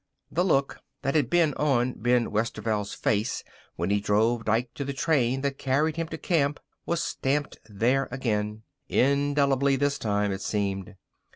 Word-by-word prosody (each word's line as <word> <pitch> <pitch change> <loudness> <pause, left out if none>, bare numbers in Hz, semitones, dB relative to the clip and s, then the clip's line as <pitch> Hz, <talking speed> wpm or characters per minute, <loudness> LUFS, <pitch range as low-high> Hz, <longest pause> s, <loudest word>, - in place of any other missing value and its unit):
The 175 - +1
look 140 -7 +1 0.2
that 135 - 0
had 145 -6 +2
been 165 -3 +3
on 130 -4 +1
Ben 120 +1 +1
Westerveld's 110 -1 -1
face 110 +2 0 0.3
when 85 +4 -1
he 105 - +3
drove 110 +3 +1
Dike 115 +3 0
to 140 - -4
the 140 0 -3
train 135 -3 +1
that 140 -1 -2
carried 150 +4 +1
him 165 0 -2
to 160 - -6
camp 150 -4 +1 0.3
was 170 0 0
stamped 145 +2 -1
there 125 +6 +1
again 110 -4 -2 0.3
indelibly 140 0 +2
this 140 +1 0
time, 105 -1 0
it 95 0 -4
seemed. 100 -2 -2
130 Hz, 160 wpm, -27 LUFS, 110-140 Hz, 0.3 s, been